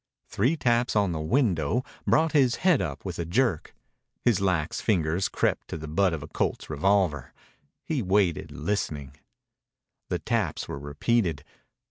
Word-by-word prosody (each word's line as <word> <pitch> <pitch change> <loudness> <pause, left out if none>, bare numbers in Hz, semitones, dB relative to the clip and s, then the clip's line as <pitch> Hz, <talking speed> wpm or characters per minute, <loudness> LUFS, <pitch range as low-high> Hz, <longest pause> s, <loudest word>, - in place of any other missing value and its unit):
Three 130 +11 0
taps 120 -3 +1
on 100 -3 +3
the 80 - -3
window 100 - +1 0.2
brought 160 0 +3
his 130 -5 +3
head 180 -7 +5
up 75 -4 -5
with 90 -3 -5
a - - 0
jerk. 95 0 0 0.5
His 115 -6 +3
lax 90 -5 0
fingers 90 -3 +1
crept - - 0
to - - -5
the 80 0 -7
butt 90 +5 +2
of 80 -3 -4
a - - -8
Colt's - - -2
revolver. 80 -4 +1 0.5
He 155 -5 -1
waited, 95 -4 +1
listening. 75 -6 -3 1.0
The - - 0
taps - - -1
were 70 - -5
repeated. 75 +3 0
95 Hz, 150 wpm, -27 LUFS, 80-120 Hz, 1.0 s, head